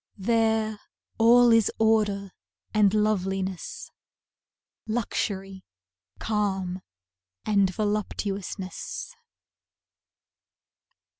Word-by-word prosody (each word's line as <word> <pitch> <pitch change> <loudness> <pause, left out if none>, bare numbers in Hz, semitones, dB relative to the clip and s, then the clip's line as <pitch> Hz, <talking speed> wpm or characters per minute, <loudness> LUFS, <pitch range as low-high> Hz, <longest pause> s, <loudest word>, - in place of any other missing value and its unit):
There, 220 0 +1 0.4
all 240 +1 +6
is 225 -2 +4
order 210 -3 +2 0.4
and 210 -2 +4
loveliness, 195 -3 -1 1.0
Luxury, 195 -4 -3 0.5
calm 190 -4 -2 0.6
and 200 -3 +3
voluptuousness. 205 - -3
210 Hz, 55 wpm, -26 LUFS, 195-220 Hz, 1.0 s, all